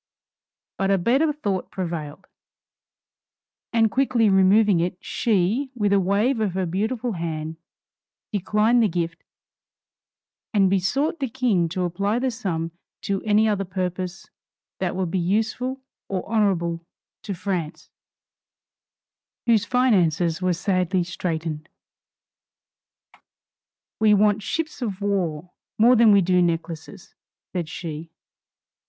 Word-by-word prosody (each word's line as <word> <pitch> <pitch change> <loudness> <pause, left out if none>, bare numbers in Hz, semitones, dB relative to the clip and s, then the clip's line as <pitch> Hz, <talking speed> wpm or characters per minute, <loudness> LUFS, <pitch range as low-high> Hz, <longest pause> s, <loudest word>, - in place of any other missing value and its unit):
But 195 - +1
a 195 - +4
better 265 - +2
thought 205 -11 -3
prevailed, 170 -2 -5 1.5
and 225 -2 +3
quickly 250 -5 +2
removing 195 0 +5
it, 175 +1 -1
she, 220 +6 0
with 205 -4 +1
a 200 - +5
wave 205 +7 +1
of 205 -4 -1
her 190 -1 0
beautiful 220 +7 -2
hand, 160 -3 -4 0.8
declined 210 +4 +2
the 220 - +4
gift 170 -2 -3 1.3
and 195 -2 +4
besought 270 - 0
the 270 -3 -2
King 225 -9 +1
to 180 +2 -2
apply 200 +5 0
the 255 +1 0
sum 170 -8 -3 0.3
to 195 -1 -2
any 215 +1 +4
other 205 -2 0
purpose 185 0 -4 0.5
that 185 -2 -1
would 185 -3 -2
be 190 - 0
useful 225 +8 -1 0.3
or 190 -2 -3
honorable 180 -6 0 0.4
to 200 -3 -5
France, 175 -4 -4 1.5
whose 230 -3 +3
finances 180 -9 +2
were 185 0 +2
sadly 185 0 0
straitened. 165 -2 -4 2.3
"We 215 -1 +5
want 210 +1 +3
ships 310 +7 -3
of 205 -6 -3
war 180 -5 -2 0.3
more 240 +3 +6
than 230 -2 +6
we 200 -1 +6
do 180 0 +3
necklaces," 170 0 -3 0.4
said 175 -4 -3
she. 160 -1 -6
195 Hz, 120 wpm, -23 LUFS, 175-220 Hz, 2.3 s, more